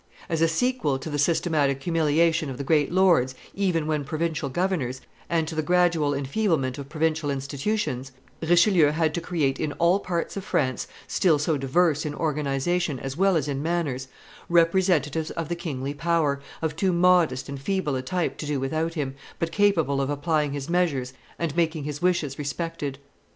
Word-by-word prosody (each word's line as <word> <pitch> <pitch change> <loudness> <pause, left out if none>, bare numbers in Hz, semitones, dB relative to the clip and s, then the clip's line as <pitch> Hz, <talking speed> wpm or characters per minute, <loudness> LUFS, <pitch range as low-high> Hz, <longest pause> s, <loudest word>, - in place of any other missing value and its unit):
As 165 -1 0
a 165 - +5
sequel 220 - 0
to 155 +4 -7
the 145 - -2
systematic 145 -3 +1
humiliation 160 -1 +2
of 130 - -6
the 140 - -4
great 150 +1 +2
lords, 175 -9 +3 0.2
even 180 -6 0
when 155 -2 -1
provincial 155 0 -2
governors, 150 -6 -1 0.3
and 165 -2 +1
to 165 - -5
the 155 - 0
gradual 170 -3 +2
enfeeblement 140 - 0
of 140 -1 -8
provincial 155 -1 0
institutions, 140 - -2 0.3
Richelieu 170 0 +5
had 155 +1 +1
to 170 - -2
create 155 -5 -1
in 150 -2 -2
all 175 +3 +3
parts 175 -3 -3
of 195 - -4
France, 130 -8 -1 0.2
still 165 -5 +3
so 155 +2 0
diverse 150 +3 +2
in 150 -1 -4
organization 150 +1 -1
as 135 +1 -5
well 195 +2 +3
as 155 - 0
in 140 -1 -2
manners, 150 -6 -1 0.4
representatives 165 -3 +2
of 165 -1 -4
the 170 - -1
kingly 140 -5 -4
power, 150 -2 0 0.2
of 160 -1 -1
too 185 +3 +1
modest 170 -7 +3
and 140 -1 -6
feeble 185 -3 -1
a 130 - -1
type 180 +5 -2
to 150 - -4
do 145 -2 -1
without 160 +5 -2
him, 140 -4 -2 0.2
but 165 0 -2
capable 165 -8 +2
of 135 - -1
applying 150 0 0
his 140 -1 -4
measures 160 -8 0 0.2
and 165 -3 -2
making 160 -3 0
his 145 0 -5
wishes 175 -7 0
respected. 145 -1 -3
155 Hz, 175 wpm, -25 LUFS, 140-170 Hz, 0.4 s, a